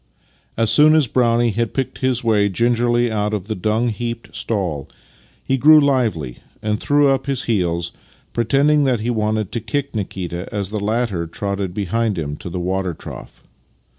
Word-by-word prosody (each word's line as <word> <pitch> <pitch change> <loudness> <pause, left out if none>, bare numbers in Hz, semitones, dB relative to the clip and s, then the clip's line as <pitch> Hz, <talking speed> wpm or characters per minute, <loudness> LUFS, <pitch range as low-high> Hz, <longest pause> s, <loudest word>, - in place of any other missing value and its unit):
As 115 -1 +3
soon 150 +6 +6
as 155 -3 +4
Brownie 120 -1 +2
had 115 +2 -2
picked 135 -2 -2
his 130 -2 +1
^\'ay 105 -3 +2
gingerly 120 +2 +2
out 105 0 0
of 95 -3 -5
the 110 - -3
dung 110 +5 0
heaped 115 +1 -5
stall 90 -11 -2 0.6
he 135 0 0
grew 155 +3 +8
lively 115 - 0 0.2
and 105 0 -1
threw 145 0 +3
up 135 +1 0
his 135 -2 -1
heels, 85 -6 0 0.4
pretending 140 +6 +3
that 125 -5 +1
he 120 +2 -1
wanted 110 -2 -1
to 115 - -3
kick 140 +6 -3
Nikita 90 -4 -4
as 100 -3 -2
the 105 -2 -3
latter 105 -6 -1
trotted 100 +1 -4
beside 105 +1 -1
him 75 -3 -3
to - - -7
the 90 +1 -4
water 90 -1 -2
trough. - - -11
110 Hz, 170 wpm, -20 LUFS, 95-120 Hz, 0.6 s, grew